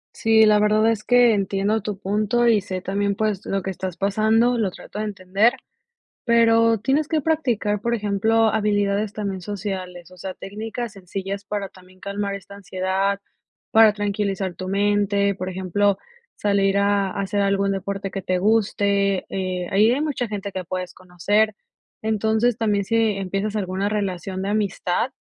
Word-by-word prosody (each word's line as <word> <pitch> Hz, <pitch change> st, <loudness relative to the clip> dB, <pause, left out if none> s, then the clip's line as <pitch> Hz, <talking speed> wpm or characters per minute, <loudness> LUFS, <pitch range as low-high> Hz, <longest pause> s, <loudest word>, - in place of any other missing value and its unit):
Sí, 220 Hz, 0 st, +4 dB
la 210 Hz, -1 st, +5 dB
verdad 215 Hz, +2 st, +3 dB
es 215 Hz, -2 st, -3 dB
que 245 Hz, -1 st, +5 dB
entiendo 200 Hz, +2 st, 0 dB
tu 205 Hz, -1 st, -4 dB
punto 215 Hz, +4 st, +1 dB
y 220 Hz, -3 st, +4 dB
sé 185 Hz, -1 st, -5 dB
también, 200 Hz, +1 st, -1 dB
pues, 210 Hz, -2 st, -1 dB
lo 195 Hz, -1 st, -1 dB
que 195 Hz, -, -3 dB
estás 185 Hz, -1 st, -5 dB
pasando, 220 Hz, +5 st, +2 dB
lo 210 Hz, -4 st, +1 dB
trato 200 Hz, -, -9 dB
de 215 Hz, -, -1 dB
entender. 200 Hz, +3 st, +1 dB, 0.7 s
Pero, 230 Hz, -1 st, +4 dB
tienes 275 Hz, +7 st, +1 dB
que 315 Hz, -1 st, 0 dB
practicar, 245 Hz, -10 st, 0 dB
por 235 Hz, +1 st, 0 dB
ejemplo, 220 Hz, +1 st, +2 dB
habilidades 205 Hz, -1 st, 0 dB
también 200 Hz, -3 st, -4 dB
sociales, 185 Hz, -3 st, -6 dB
o 185 Hz, -, -15 dB
sea, 185 Hz, +1 st, -6 dB
técnicas 220 Hz, +3 st, -6 dB
sencillas 195 Hz, +1 st, -6 dB
para 200 Hz, -1 st, -4 dB
también 185 Hz, 0 st, -19 dB
calmar 200 Hz, 0 st, -3 dB
esta 200 Hz, 0 st, -11 dB
ansiedad, 190 Hz, 0 st, -1 dB, 0.5 s
para 220 Hz, -1 st, +7 dB
tranquilizar 200 Hz, -2 st, -2 dB
tu 185 Hz, +1 st, -7 dB
mente, 200 Hz, 0 st, +1 dB
por 185 Hz, -1 st, -5 dB
ejemplo, 190 Hz, +2 st, 0 dB, 0.4 s
salir 200 Hz, -1 st, +1 dB
a 200 Hz, -1 st, +2 dB
hacer 200 Hz, +1 st, -1 dB
algún 200 Hz, 0 st, +1 dB
deporte 195 Hz, 0 st, -4 dB
que 195 Hz, -, -4 dB
te 185 Hz, 0 st, 0 dB
guste. 200 Hz, -1 st, +1 dB
Eh, 185 Hz, -2 st, -3 dB
ahí 210 Hz, +4 st, +4 dB
hay 265 Hz, +4 st, 0 dB
mucha 285 Hz, -5 st, -1 dB
gente 200 Hz, -2 st, -5 dB
que 185 Hz, -1 st, -4 dB
puedes 185 Hz, +1 st, -4 dB
conocer. 200 Hz, +4 st, 0 dB, 0.5 s
Entonces, 220 Hz, +2 st, +1 dB
también, 205 Hz, -3 st, +1 dB
si 230 Hz, -, -1 dB, 0.2 s
empiezas 195 Hz, +2 st, -2 dB
alguna 195 Hz, 0 st, -1 dB
relación 190 Hz, -2 st, -3 dB
de 195 Hz, -, -2 dB
amistad, 205 Hz, +1 st, 0 dB
200 Hz, 160 wpm, -22 LUFS, 195-215 Hz, 0.7 s, para